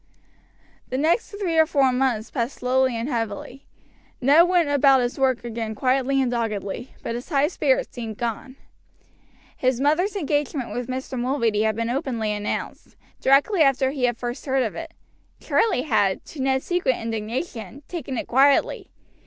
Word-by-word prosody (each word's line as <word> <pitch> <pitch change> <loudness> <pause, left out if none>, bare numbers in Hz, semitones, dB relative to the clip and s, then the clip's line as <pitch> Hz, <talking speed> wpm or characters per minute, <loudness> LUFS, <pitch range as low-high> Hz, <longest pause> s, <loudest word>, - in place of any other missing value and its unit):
The 255 - -2
next 325 - +1
three 380 -6 -1
or 320 - +5
four 275 -4 +3
months 250 -4 0
passed 245 +1 -2
slowly 255 0 +1
and 230 +2 -3
heavily. 235 +1 -4 0.5
Ned 290 +7 +6
went 350 -3 +3
about 280 -2 +5
his 245 +2 -2
work 260 -3 +1
again 225 -2 -4
quietly 265 +3 +1
and 255 -2 +1
doggedly; 225 -1 -3
but - - -3
his 240 +6 -6
high 285 -2 +3
spirits - - 0
seemed 225 -4 -6
gone. 240 +3 -4 1.0
His 255 -1 0
mother's 310 +9 +1
engagement 290 - -1
with 245 0 -4
Mr. 260 0 -4
Mulready 235 -4 +1
had 220 -1 +1
been 230 +1 -2
openly 240 -5 -2
announced, 210 0 -4 0.2
directly 285 +8 +3
after 270 -2 +3
he 270 -3 0
had 240 -1 0
first 240 +4 -5
heard 265 -1 +2
of 220 - -3
it. 330 0 -8 0.4
Charlie 385 - +1
had, 210 -9 +1
to 295 - -8
Ned's 265 0 0
secret 350 -8 +1
indignation, 225 - -5
taken 275 -7 -5
it - - -3
quietly. 275 +3 +3
260 Hz, 160 wpm, -23 LUFS, 235-285 Hz, 1.0 s, Ned